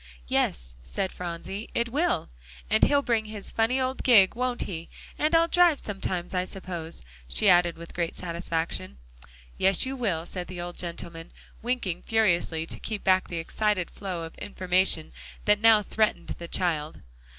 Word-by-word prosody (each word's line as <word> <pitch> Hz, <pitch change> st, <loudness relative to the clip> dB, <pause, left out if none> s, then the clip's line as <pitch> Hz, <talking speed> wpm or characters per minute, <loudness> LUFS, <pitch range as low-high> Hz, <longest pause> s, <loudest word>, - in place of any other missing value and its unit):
"Yes," -, -, 0 dB
said 65 Hz, -, -2 dB
Phronsie, 180 Hz, +4 st, -6 dB
"it 235 Hz, 0 st, +1 dB
will. 285 Hz, -, 0 dB, 0.4 s
And -, -, +4 dB
he'll 285 Hz, -1 st, +5 dB
bring 230 Hz, -4 st, +1 dB
his 215 Hz, -2 st, -3 dB
funny 230 Hz, +4 st, +1 dB
old 260 Hz, 0 st, -1 dB
gig, 205 Hz, -7 st, +6 dB
won't 250 Hz, 0 st, -1 dB
he, 170 Hz, -3 st, -6 dB, 0.3 s
and 305 Hz, +1 st, +2 dB
Ill 330 Hz, 0 st, +5 dB
drive 345 Hz, -3 st, +4 dB
sometimes, 190 Hz, -3 st, -4 dB
I 180 Hz, -1 st, +1 dB
suppose?" 175 Hz, -, -7 dB, 0.2 s
she 60 Hz, 0 st, +1 dB
added 175 Hz, -1 st, +5 dB
with 170 Hz, 0 st, -10 dB
great 170 Hz, -1 st, -2 dB
satisfaction. 165 Hz, -, -3 dB, 0.6 s
"Yes; 190 Hz, +3 st, +4 dB
you 265 Hz, +1 st, -3 dB
will," 190 Hz, -10 st, -1 dB
said 180 Hz, 0 st, -6 dB
the 180 Hz, -1 st, -7 dB
old 175 Hz, 0 st, -6 dB
gentleman, 170 Hz, -1 st, -5 dB, 0.3 s
winking 230 Hz, -8 st, -2 dB
furiously 175 Hz, -7 st, +1 dB
to -, -, -6 dB
keep 215 Hz, -2 st, -4 dB
back 185 Hz, 0 st, +3 dB
the 170 Hz, -, -5 dB
excited 185 Hz, +2 st, 0 dB
flow 185 Hz, -4 st, -5 dB
of 165 Hz, -, -7 dB
information 185 Hz, -4 st, +1 dB, 0.3 s
that 210 Hz, 0 st, +4 dB
now 225 Hz, -2 st, +6 dB
threatened 215 Hz, +2 st, 0 dB
the 170 Hz, -, -6 dB
child. 160 Hz, -4 st, -1 dB
185 Hz, 160 wpm, -27 LUFS, 170-220 Hz, 0.6 s, gig